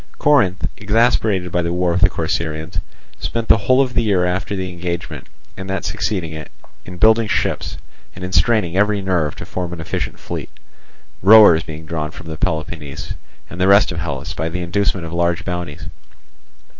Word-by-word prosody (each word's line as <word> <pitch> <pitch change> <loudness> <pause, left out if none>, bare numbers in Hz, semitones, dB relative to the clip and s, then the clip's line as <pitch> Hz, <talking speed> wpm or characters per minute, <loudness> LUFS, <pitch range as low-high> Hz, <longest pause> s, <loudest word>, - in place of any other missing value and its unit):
Corinth, 100 -11 +3
exasperated 105 -3 +1
by 90 - +1
the 85 0 -2
war 90 0 +1
with 90 +1 0
the 85 - +6
Corcyraeans, 80 -2 -3 0.4
spent 115 -1 -3
the - - +7
whole 130 +6 +3
of 125 -2 -5
the - - +2
year 100 -5 +2
after 90 +3 -2
the 95 -1 -4
engagement 85 0 -5 0.3
and 95 0 -7
that 95 - -2
succeeding 100 -7 -2
it 80 0 -8 0.4
in 90 -1 -9
building 110 +3 +4
ships, - - -1 0.4
and 90 - -8
in 90 - -6
straining 90 +1 +2
every 105 +1 +2
nerve 90 -6 0
to - - -8
form 90 -2 -4
an 85 - -6
efficient 80 - -4
fleet; - - -6 0.7
rowers 100 -4 +8
being 80 0 -9
drawn 80 -1 -3
from 80 0 -8
Peloponnese 80 -4 -3 0.3
and 90 +6 -7
the 95 - +4
rest 100 0 +5
of 80 - -4
Hellas 80 -1 -4
by 80 +1 -2
the 90 +2 -4
inducement 95 0 -1
of 80 - -7
large 85 +2 0
bounties. 90 -5 -5
90 Hz, 180 wpm, -19 LUFS, 80-100 Hz, 0.7 s, rowers